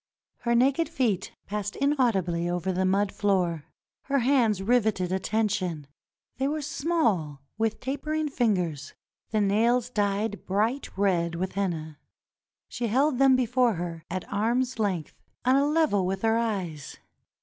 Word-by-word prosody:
Her 235 0 +1
naked 275 +7 +3
feet 215 -8 -1
passed 205 -1 -4
inaudibly 200 - +1
over 180 +1 -1
the 185 +1 0
mud 200 +1 +1
floor. 180 -7 0 0.4
Her 275 0 +1
hands 240 -6 +2
riveted 215 -5 +1
attention. 190 -5 -1 0.5
They 265 +2 0
were 300 +1 -2
small, 215 - 0 0.2
with 220 -1 0
tapering 305 +4 -2
fingers, 185 - -1 0.3
the 215 -1 +1
nails 230 +5 +2
dyed 205 -1 -1
bright 220 +8 0
red 175 -4 +1
with 185 +2 -2
henna. 160 -6 -3 0.7
She 240 -1 -3
held 265 +4 +2
them 270 -1 +6
before 245 -2 +2
her 170 -1 -5
at 185 +1 -4
arm's 240 +4 0
length, 185 -8 -2 0.2
on 255 +1 +5
a 280 +1 +3
level 295 - +2
with 190 +2 -3
her 225 0 +3
eyes. 190 -11 -3
210 Hz, 140 wpm, -27 LUFS, 185-250 Hz, 0.7 s, them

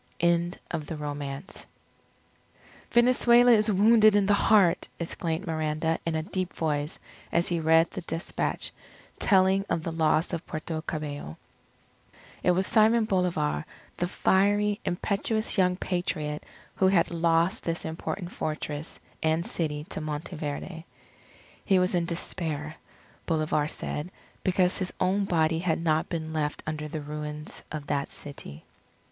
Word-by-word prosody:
END 170 +1 +2
OF 155 -3 -3
THE 160 - -4
ROMANCE 145 +2 -6 1.2
"Venezuela 240 0 +5
is 215 -1 +4
wounded 215 +2 +6
in 205 -1 +4
the 205 - +4
heart!" 200 -4 +4
exclaimed 165 +1 -2
Miranda 160 0 -1
in 165 - 0
a 160 - -1
deep 185 +1 -3
voice 150 -1 -1 0.3
as 170 - +2
he 170 -1 0
read 160 +1 +4
the 185 - -5
despatch 165 0 -3 0.5
telling 190 -1 +4
of 160 - 0
the 165 - -3
loss 160 +1 +2
of 170 - -2
Puerto 155 0 -4
Cabello. 145 - -5 1.0
It - - +2
was 185 +2 +3
Simon 220 +2 +4
Bolivar, 175 - 0 0.3
the 175 - 0
fiery, 205 +3 +2
impetuous, 215 +4 -1
young 180 -1 +4
Patriot, 160 -5 -2 0.3
who 190 - +4
had 180 -3 +3
lost 170 +1 +2
this 165 0 -2
important 175 +3 -4
fortress 155 0 -4 0.2
and 160 +2 +1
city 150 -3 -2
to - - -4
Monteverde. 155 +1 -5 0.8
He 195 - +3
was 180 +1 +2
in 175 -1 +1
despair, 160 -3 -3 0.5
Bolivar 155 -2 +1
said, 150 +1 -4 0.3
because 185 0 +2
his 185 -1 -2
own 195 +2 +2
body 160 -3 +2
had 170 -2 0
not 160 -1 +1
been 160 -2 -4
left 150 -1 -2
under 155 -1 -3
the 155 0 -5
ruins 150 +1 -6
of 150 -2 -5
that 140 -1 -1
city. 80 - -9
165 Hz, 140 wpm, -27 LUFS, 155-185 Hz, 1.2 s, wounded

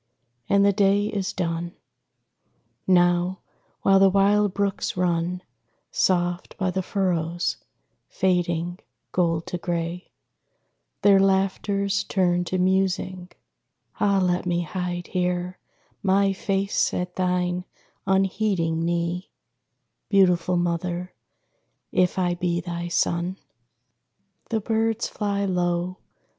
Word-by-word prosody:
And 200 0 +4
the 200 - +4
day 200 +1 +3
is 195 -2 -2
done. 170 -1 -3 1.1
Now, 175 0 +3 0.5
while 195 0 +5
the 195 0 +6
wild 200 +1 +3
brooks 200 -1 -2
run 180 0 0 0.5
Soft 175 - 0
by 185 -1 0
the 190 +1 -1
furrows 175 -3 -1 0.5
fading, 175 -1 0 0.3
gold 165 -2 +1
to 180 - -4
gray, 170 +1 -3 0.9
Their 200 -1 +6
laughters 195 +1 +1
turned 175 -3 +1
to 185 - -1
musing 185 -1 0 0.7
ah, 200 -1 +3
let 180 -1 0
me 175 0 +1
Hide 175 +1 -4
here 180 0 -2 0.4
my 195 0 +3
face 195 0 0
at 180 0 -3
thine 180 -1 0 0.4
unheeding 190 -4 +1
knee, 170 +2 -1 0.8
Beautiful 180 -2 +3
Mother; 175 +1 -2 0.8
if 180 0 +2
I 180 -2 +1
be 175 -1 -1
thy 170 0 -4
son. 170 +2 0 1.1
The 225 -2 0
birds 225 +1 0
fly 200 -1 -2
low. 180 -1 -1
180 Hz, 105 wpm, -24 LUFS, 175-195 Hz, 1.1 s, the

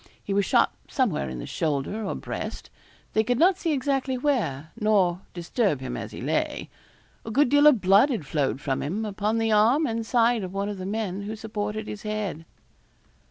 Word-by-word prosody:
He 200 - -3
was 200 0 +2
shot - - +3 0.2
somewhere 205 - 0
in 65 - -6
the - - -6
shoulder 155 +8 -2
or 195 - -3
breast - - -6 0.4
they 220 - +3
could 245 +2 0
not 360 +5 +4
see 330 - 0
exactly 270 -2 0
where, 165 - -1
nor 195 -5 +2
disturb 175 - 0
him 130 -2 -5
as - - -6
he - - -8
lay. - - -2 0.5
A - - -7
good 265 +4 +3
deal 290 +2 +6
of 260 -9 +5
blood 195 +9 +5
had 225 - -2
flowed 135 -2 -1
from 135 -2 -2
him, 200 +10 -2
upon 210 +2 -1
the 225 0 +1
arm 230 +9 +4
and 230 -3 -2
side 235 0 +2
of 185 +1 -6
one 200 +1 -1
of 205 -2 -5
the 185 - -4
men 200 -2 -2
who 210 +2 -5
supported 215 0 -4
his 210 - -6
head. 210 -6 -4
210 Hz, 200 wpm, -26 LUFS, 185-235 Hz, 0.5 s, deal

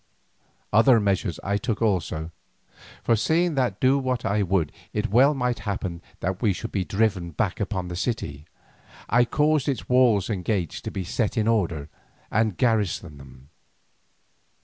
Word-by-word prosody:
Other 115 +2 +6
measures 100 -3 0
I 100 +1 0
took 110 0 -2
also, 85 -7 -1 0.7
for 115 - +3
seeing 160 +10 +1
that 125 -8 0
do 135 +2 +3
what 130 -2 -2
I 100 +2 +1
would 95 -5 +1 0.2
it 105 +2 -2
well 135 +6 +5
might 125 -2 -1
happen 95 -4 -4 0.2
that 95 +2 -2
we 105 -5 +3
should 115 +5 -6
be 95 - -1
driven 95 -3 0
back 85 +4 -2
upon 95 -3 -2
the 90 - -5
city, 80 - -3 0.6
I 120 +1 +4
caused 150 +3 +1
its 135 - -3
walls 120 -6 +4
and 100 -5 -3
gates 95 -5 -2
to - - -5
be 95 - -4
set 105 +5 -2
in 110 0 +1
order, 85 -10 0 0.4
and 110 -3 +1
garrisoned 100 - 0
them. 65 0 -15
105 Hz, 160 wpm, -25 LUFS, 90-120 Hz, 0.7 s, Other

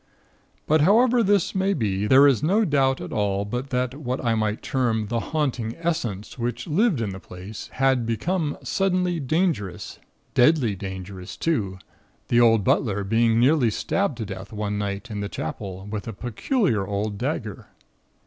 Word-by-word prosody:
"But 155 0 +3
however 235 +8 +5
this 205 -4 +2
may 195 +1 +1
be, 105 -5 -1
there 135 +5 +7
is 135 -4 +4
no 200 +9 +3
doubt 135 -5 +2
at - - -7
all 100 -1 0
but 125 +6 -4
that 125 -1 -1
what 130 -2 -3
I 115 - +3
might 110 -1 -1
term 115 -5 0
the 120 0 0
Haunting 130 -6 -2
Essence 130 - -3
which 120 0 -3
lived 180 - +2
in 105 -3 -2
the 95 - -7
place, 95 +3 -9
had 130 -2 +2
become 145 - -1
suddenly 180 -3 0
dangerous 140 - -1 0.3
deadly 125 -5 +4
dangerous 95 -1 -7
too, 105 - -1 0.5
the 120 0 +4
old 115 -3 +5
butler 100 -1 +1
being 115 +2 +2
nearly 130 -1 +4
stabbed 150 - -1
to 110 - -4
death 95 0 -8
one 105 -1 -3
night 100 +2 -4
in 105 - -4
the 100 0 -3
Chapel, 95 +3 -6
with 105 +2 -5
a 115 - -4
peculiar 120 - 0
old 100 0 -2
dagger. - - -3
120 Hz, 165 wpm, -24 LUFS, 105-155 Hz, 0.5 s, there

